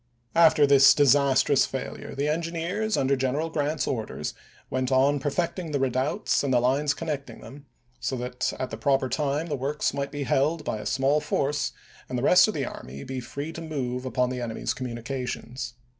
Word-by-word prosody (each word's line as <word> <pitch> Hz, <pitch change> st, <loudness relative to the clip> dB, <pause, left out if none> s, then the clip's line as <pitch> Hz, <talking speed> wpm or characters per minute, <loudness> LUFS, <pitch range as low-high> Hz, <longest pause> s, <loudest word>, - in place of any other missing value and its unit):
After 160 Hz, -3 st, +6 dB
this 135 Hz, -1 st, +7 dB
disastrous 140 Hz, -1 st, +4 dB
failure 135 Hz, +1 st, -6 dB
the 140 Hz, +2 st, -1 dB
engineers, 170 Hz, +7 st, -1 dB
under 135 Hz, +1 st, +2 dB
General 135 Hz, +5 st, -1 dB
Grant's 150 Hz, -1 st, -1 dB
orders, 110 Hz, -4 st, -3 dB, 0.3 s
went 130 Hz, 0 st, -2 dB
on 140 Hz, +2 st, +3 dB
perfecting 170 Hz, +4 st, -2 dB
the 140 Hz, -, +1 dB
redoubts 130 Hz, +3 st, 0 dB
and 140 Hz, -, 0 dB
the 125 Hz, -, +4 dB
lines 140 Hz, +4 st, +1 dB
connecting 150 Hz, -4 st, -5 dB
them 140 Hz, +1 st, -12 dB, 0.3 s
so 130 Hz, -, -2 dB
that 125 Hz, 0 st, -2 dB
at 130 Hz, -, -3 dB
the 110 Hz, -, -5 dB
proper 135 Hz, +2 st, +1 dB
time 145 Hz, +4 st, -1 dB
the 155 Hz, -4 st, -2 dB
works 140 Hz, +3 st, -1 dB
might 140 Hz, 0 st, -3 dB
be 145 Hz, -1 st, -3 dB
held 150 Hz, +4 st, +1 dB
by 110 Hz, -, -2 dB
a -, -, -5 dB
small 135 Hz, +3 st, +2 dB
force 145 Hz, -1 st, -1 dB, 0.4 s
and 125 Hz, -, -2 dB
the 120 Hz, -, -2 dB
rest 180 Hz, +6 st, +7 dB
of 215 Hz, -, -3 dB
the 140 Hz, -3 st, -1 dB
army 70 Hz, -, -8 dB
be 130 Hz, -1 st, -5 dB
free 140 Hz, +6 st, -6 dB
to 165 Hz, -, -7 dB
move 130 Hz, -6 st, -3 dB
upon 125 Hz, 0 st, 0 dB
the 125 Hz, -1 st, -4 dB
enemy's 115 Hz, -2 st, -2 dB
communications. 125 Hz, 0 st, -5 dB
140 Hz, 185 wpm, -26 LUFS, 130-150 Hz, 0.4 s, this